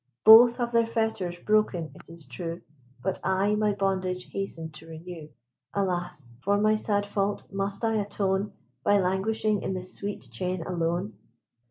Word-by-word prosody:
Both 235 +2 +9
have 240 -2 -1
their 230 -1 +3
fetters 220 -6 -1
broken, 180 -5 +1
it - - -16
is 165 -2 -8
true, 165 +7 -6 0.4
But 190 - -1
I 190 +2 +2
my 210 0 +2
bondage 185 -2 -1
hasten 165 -5 -4
to 155 +1 -12
renew. 165 -1 -9 0.5
Alas! 175 -9 -2
for 200 +5 +2
my 215 +1 +3
sad 205 -1 +1
fault 205 0 -1
must 195 +2 -2
I 225 -1 +2
atone, 200 0 -1 0.3
By 205 0 +4
languishing 200 +3 +1
in 190 - -2
this 185 0 -5
sweet 205 0 -5
chain 185 -2 -2
alone? 175 +3 -2
195 Hz, 155 wpm, -27 LUFS, 175-210 Hz, 0.5 s, Both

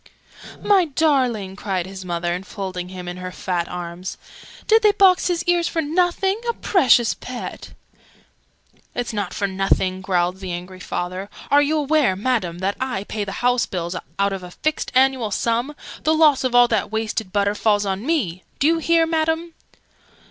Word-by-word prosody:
"My 390 -3 +4
darling!" 260 - +1
cried 190 -3 -2
his 190 0 -8
mother, 175 -1 -2
enfolding 185 -1 -5
him 180 -1 -8
in 175 0 -5
her 185 0 -6
fat 175 -2 -2
arms. 175 +1 -6 0.5
"Did 445 +1 +5
they 420 -2 +5
box 375 -2 +5
his 345 -1 0
ears 350 -1 +2
for 330 - -2
nothing? 360 +6 +1
A - - +1
precious 260 - +3
pet!" 250 -1 -8 1.2
"It's 240 -1 -3
not 205 -3 -2
for 200 - -2
nothing!" 190 -1 0
growled 180 -1 0
the 185 -2 -5
angry 180 +1 -7
father. 185 +2 -4 0.2
"Are 285 +1 +6
you 300 +2 +1
aware, 295 -7 +2
Madam, 195 -5 -1
that 190 +3 -2
I 255 -7 -2
pay 210 0 -4
the 195 - -5
house 245 -1 +3
bills, 175 -1 -4 0.2
out 200 0 +1
of 195 - -4
a 180 - -9
fixed 310 +11 -2
annual 260 -3 +3
sum? 235 +7 -1 0.3
The 315 +1 +2
loss 305 -4 +4
of 255 -2 0
all 245 0 +7
that 215 -2 0
wasted 220 -2 -2
butter 200 0 +1
falls 210 -1 +1
on 195 +1 -2
me! 235 - -1 0.2
Do 275 - 0
you 330 +2 +4
hear, 330 0 +3
Madam!" 325 +1 -1
220 Hz, 175 wpm, -21 LUFS, 185-305 Hz, 1.2 s, all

